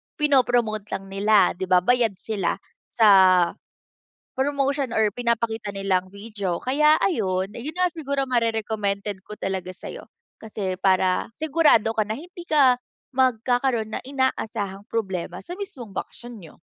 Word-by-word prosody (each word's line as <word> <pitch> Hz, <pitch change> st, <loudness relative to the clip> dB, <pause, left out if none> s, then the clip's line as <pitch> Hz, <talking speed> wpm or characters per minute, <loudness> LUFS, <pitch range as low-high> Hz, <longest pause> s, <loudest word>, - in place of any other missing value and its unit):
pino-promote 245 Hz, -8 st, +2 dB
lang 195 Hz, 0 st, -8 dB
nila, 205 Hz, +1 st, +4 dB
'di 185 Hz, +1 st, -5 dB
ba, 180 Hz, -1 st, +4 dB
bayad 235 Hz, -1 st, +2 dB
sila 195 Hz, -1 st, -2 dB, 0.4 s
sa 185 Hz, -5 st, +6 dB, 0.8 s
promotion 275 Hz, 0 st, 0 dB
or 215 Hz, -2 st, +2 dB
pinapakita 230 Hz, -2 st, -1 dB
nilang 195 Hz, -2 st, -1 dB
video 200 Hz, -3 st, -4 dB
kaya 300 Hz, -, +3 dB
ayun 195 Hz, -, -1 dB
'yun 275 Hz, +8 st, -6 dB
nga, 365 Hz, -, +3 dB
siguro 280 Hz, -4 st, -2 dB
mare-recommended 215 Hz, -5 st, -1 dB
ko 210 Hz, +2 st, -11 dB
talaga 190 Hz, -1 st, -3 dB
sa'yo, 185 Hz, -, -9 dB, 0.3 s
kasi 205 Hz, -4 st, -4 dB
para 185 Hz, -1 st, +2 dB
sigurado 300 Hz, -8 st, +3 dB
ka 220 Hz, -, +1 dB
na 220 Hz, -, -2 dB
hindi 355 Hz, +4 st, -11 dB
ka 280 Hz, -5 st, +5 dB, 0.4 s
magkakaroon 245 Hz, -2 st, +1 dB
na -, -, -3 dB
inaasahang 225 Hz, -7 st, -2 dB
problema 190 Hz, -6 st, -3 dB
sa 350 Hz, -, -6 dB
mismong 275 Hz, -, -8 dB
bakasyon 235 Hz, +3 st, -7 dB
niyo. 165 Hz, -, -14 dB
220 Hz, 135 wpm, -24 LUFS, 195-260 Hz, 0.8 s, sa